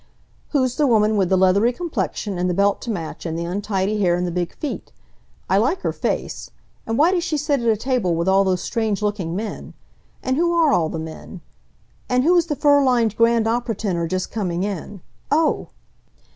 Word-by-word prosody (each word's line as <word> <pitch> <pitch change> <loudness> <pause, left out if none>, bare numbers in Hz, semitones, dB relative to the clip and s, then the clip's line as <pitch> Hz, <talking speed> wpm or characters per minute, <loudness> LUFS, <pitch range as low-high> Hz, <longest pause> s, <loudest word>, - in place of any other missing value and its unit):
"Who's 260 -4 0
the 295 - +3
woman 215 -2 +3
with 190 -4 +1
the 190 - +3
leathery 190 +5 +4
complexion 240 - -3
and 180 +1 0
the 180 - -1
belt 200 +1 +2
to 240 - -6
match, 170 -8 -5
and 165 -1 -3
the 170 - -3
untidy 200 +2 -1
hair 175 -3 +3
and 180 0 -1
the 175 - -2
big 175 0 -3
feet? 300 - -5 0.6
I 195 - +3
like 260 - +1
her - - -1
face. - - -3 0.4
And 225 0 -1
why 320 +5 +5
does 355 -2 0
she 315 -4 -1
sit 290 -1 0
at 235 - -2
a 220 -1 +3
table 230 -7 0
with 170 +2 -1
all 195 +1 +4
those 185 -2 0
strange 220 -3 -1
looking 200 -5 -2
men? 215 +2 -6 0.5
And 260 0 0
who 345 +1 +2
are 320 -4 +4
all 160 -2 +2
the 165 - -4
men? 160 +3 -8 0.7
And 250 0 +2
who 345 +5 +4
is 345 -1 +3
the 300 - -1
fur 285 0 +4
lined 235 -5 +2
grand 230 0 +3
opera 235 0 -1
tenor 180 -5 -2
just 185 +2 -3
coming 180 -5 -2
in 200 -1 -5 0.3
Oh!" 310 +2 +1
215 Hz, 210 wpm, -21 LUFS, 185-260 Hz, 0.7 s, why